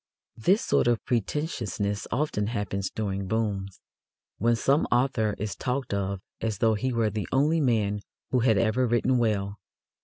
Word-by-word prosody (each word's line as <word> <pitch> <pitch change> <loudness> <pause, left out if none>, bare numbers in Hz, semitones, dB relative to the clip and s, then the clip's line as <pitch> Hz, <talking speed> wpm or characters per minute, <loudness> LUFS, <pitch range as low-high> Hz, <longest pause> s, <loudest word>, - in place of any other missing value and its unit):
This 185 - +2
sort - - +2
of 120 -2 +1
pretentiousness 110 - -2
often 125 -6 0
happens 100 -4 -2
during 100 -3 -3
"booms," 100 -3 -2 0.6
when 115 +3 +3
some 140 +6 +2
author 120 -4 +2
is 105 0 -3
talked 130 -2 -2
of 100 -1 -2 0.2
as 110 -3 -1
though 110 +1 +3
he 130 +5 -1
were 115 -3 +1
the 105 -1 -3
only 150 +5 +3
man 105 -6 +1 0.3
who 125 - +3
had 115 -3 +3
ever 115 +4 +2
written 120 +2 +2
well. 105 -3 0
110 Hz, 155 wpm, -27 LUFS, 100-125 Hz, 0.6 s, when